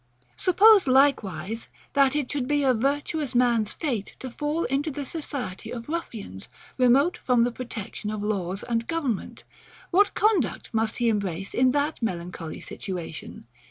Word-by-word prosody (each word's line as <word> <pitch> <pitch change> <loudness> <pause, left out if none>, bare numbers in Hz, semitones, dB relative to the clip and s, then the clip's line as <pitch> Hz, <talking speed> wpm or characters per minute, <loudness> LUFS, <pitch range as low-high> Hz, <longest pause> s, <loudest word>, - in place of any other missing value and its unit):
Suppose 400 0 +6
likewise, 225 - +2 0.3
that 275 0 +4
it 290 -4 -1
should 275 -4 -2
be 290 0 +2
a 260 -2 +4
virtuous 280 +3 -1
man's 235 -3 +3
fate 245 -11 -3
to 260 - -7
fall 300 +5 -1
into 275 +5 0
the 285 -1 -5
society 270 - -5
of 235 +2 -7
ruffians, 225 - -5 0.3
remote 265 +7 +4
from 245 -2 +2
the 245 - +1
protection 230 -4 -6
of 210 -1 -3
laws 195 -2 -2
and 230 -1 -1
government; 285 - -3 0.5
what 400 +3 +4
conduct 375 - +1
must 225 0 0
he 240 - +1
embrace 195 -4 -1
in 255 0 +4
that 290 0 0
melancholy 175 -5 -4
situation? 175 -9 -6
250 Hz, 150 wpm, -26 LUFS, 210-290 Hz, 0.5 s, Suppose